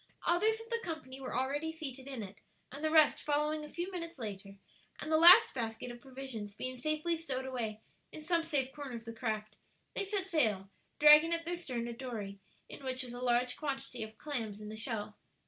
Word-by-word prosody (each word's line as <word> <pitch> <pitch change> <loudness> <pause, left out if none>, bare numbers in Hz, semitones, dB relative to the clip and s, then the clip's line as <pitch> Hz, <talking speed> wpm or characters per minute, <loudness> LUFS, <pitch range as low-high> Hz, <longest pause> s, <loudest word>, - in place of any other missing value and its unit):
Others 430 +6 +3
of 455 +1 -12
the 465 - +2
company 315 - -6
were 260 - -3
already 285 +5 -1
seated 275 -5 -7
in 260 -5 -5
it, 195 +1 -10 0.3
and 280 +3 -8
the 315 - +2
rest 310 -1 +5
following 300 +1 0
a 300 - -8
few 350 +4 -4
minutes 335 -3 -6
later, 195 -4 -6 0.4
and 310 - -5
the 315 - +5
last 355 +8 +9
basket 230 0 -4
of 240 0 -11
provisions 255 -6 -6
being 255 +2 -4
safely 310 +6 0
stowed 270 -6 -4
away 225 -5 -3 0.3
in 310 - -8
some 335 +1 +2
safe 285 -5 0
corner 285 -4 -6
of 230 0 -8
the 230 - -6
craft, 215 -2 -3 0.4
they - - -1
set 395 -1 -1
sail, 215 - +1 0.3
dragging 300 +2 +8
at 335 0 -1
their 345 - -2
stern 255 -9 -3
a 235 - -4
dory 225 -6 -6 0.3
in - - -11
which 260 0 -3
was 245 -1 -8
a 245 - -6
large 250 0 +2
quantity 270 -4 -4
of 220 0 -7
clams 225 -9 -4
in 210 0 -8
the 215 - -6
shell. 215 -2 -4
265 Hz, 210 wpm, -33 LUFS, 230-315 Hz, 0.4 s, last